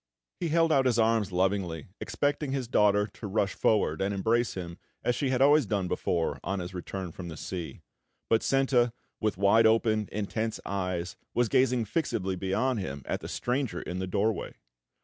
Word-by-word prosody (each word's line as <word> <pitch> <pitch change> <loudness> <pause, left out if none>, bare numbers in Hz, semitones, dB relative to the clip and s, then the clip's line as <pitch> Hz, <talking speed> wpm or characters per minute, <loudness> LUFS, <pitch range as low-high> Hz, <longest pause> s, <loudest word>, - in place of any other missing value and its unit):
He 170 - -1
held 165 +1 +3
out 135 -3 +4
his 120 -2 +2
arms 110 -3 +2
lovingly, 90 -3 -1
expecting 145 -1 -1
his 130 -3 -2
daughter 105 -3 +3
to 105 0 -9
rush 100 -1 0
forward 100 -7 +1
and 100 +1 0
embrace 115 +4 +1
him 85 -2 -6 0.2
as 125 - +2
she 135 +1 -1
had 130 0 +3
always 145 -3 +5
done 100 -3 0
before 85 -2 -1
on 100 - -2
his 90 +1 -6
return 90 0 -5
from 85 -1 -7
sea; 90 -1 -6 0.5
but 115 - +3
Senta, 130 -3 +2 0.3
with 110 -4 0
wide 105 +3 +5
open, 110 -2 +2
intense 110 +2 -2
eyes, 90 -2 -3 0.2
was 120 -2 +2
gazing 125 -1 +3
fixedly 105 - -1
beyond 100 +7 0
him 70 -7 -5
at - - -2
the - - -8
stranger 125 0 -1
in 90 +1 -5
the 95 - -2
doorway. 105 +3 -1
105 Hz, 175 wpm, -29 LUFS, 95-120 Hz, 0.5 s, always